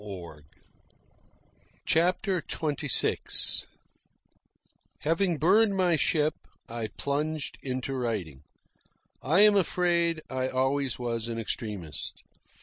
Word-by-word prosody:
CHAPTER 180 +2 +1
XXVI 150 -4 +1 1.4
Having 165 +2 +1
burned 195 +6 +4
my 180 -3 +3
ship, 155 0 +2 0.3
I 115 -1 -4
plunged 150 +1 -2
into 130 0 -3
writing. 105 - -3 0.8
I 160 +9 +3
am 210 -1 +7
afraid 170 -3 +2
I 130 0 -2
always 130 +1 0
was 115 -2 -3
an 115 -1 -4
extremist. 105 - -4
145 Hz, 85 wpm, -28 LUFS, 120-170 Hz, 1.4 s, am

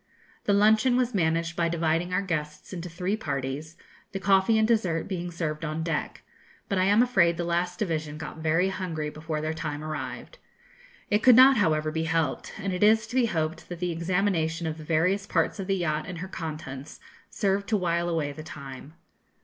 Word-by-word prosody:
The 205 - +3
luncheon 220 +5 +4
was 250 -1 +1
managed 165 -2 0
by 170 -1 +1
dividing 165 +1 0
our 185 +2 +1
guests 150 -2 -4
into 180 -1 -5
three 180 +4 -2
parties, 145 -2 -4 0.4
the 195 - -2
coffee 195 +3 +4
and 220 0 +3
dessert 185 -8 +1
being 175 -2 -3
served 165 -2 -3
on 155 0 -2
deck; 165 0 -3 0.4
but 195 - 0
I 185 - +3
am 205 +4 +5
afraid 170 -9 +3
the 175 - -1
last 175 +1 -1
division 155 -6 -2
got 155 0 -7
very 165 +4 +2
hungry 165 -6 -3
before 155 0 -4
their 155 +1 -2
time 150 -2 -4
arrived. 155 - -6 0.7
It 210 +1 +3
could 250 -1 +7
not, 260 +1 +8
however, 155 -5 +2
be 160 +1 -1
helped, 160 -4 -1
and 195 -1 -3
it 180 - -3
is 220 +1 +5
to 235 +3 -8
be 250 -2 +4
hoped 160 -4 -2
that 175 - -5
the 180 -1 -1
examination 170 -1 0
of 160 0 -3
the - - -8
various 180 +6 +1
parts - - 0
of 190 - -4
the 195 -1 +1
yacht 155 -3 -1
and 180 - -6
her 180 +3 -5
contents 155 -6 -7 0.3
served 200 -1 0
to 215 - +3
while 170 -2 0
away 160 -4 -1
the 145 - -8
time. 140 0 -9
170 Hz, 200 wpm, -27 LUFS, 155-195 Hz, 0.7 s, not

